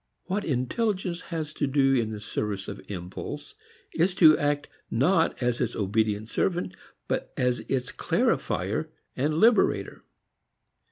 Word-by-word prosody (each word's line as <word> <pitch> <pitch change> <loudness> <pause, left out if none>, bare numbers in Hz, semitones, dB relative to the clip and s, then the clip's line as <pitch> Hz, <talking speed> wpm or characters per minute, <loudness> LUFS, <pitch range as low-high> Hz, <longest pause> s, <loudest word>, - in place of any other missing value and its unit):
What 200 +2 -2
intelligence 180 - -1
has 160 -4 -5
to 145 - -1
do 135 0 +3
in 115 -4 +2
the 110 -1 -5
service 105 -2 -3
of 100 -1 -6
impulse 90 -2 -6 0.4
is 180 +2 +2
to 160 -5 +8
act 145 0 0 0.2
not 160 +4 +2
as 120 -1 0
its 125 - -1
obedient 105 +1 0
servant 175 +8 -1 0.3
but - - -2
as 125 -1 +1
its 125 -2 -1
clarifier - - 0 0.3
and 150 +4 0
liberator. 225 +8 +3
135 Hz, 130 wpm, -27 LUFS, 110-170 Hz, 0.4 s, to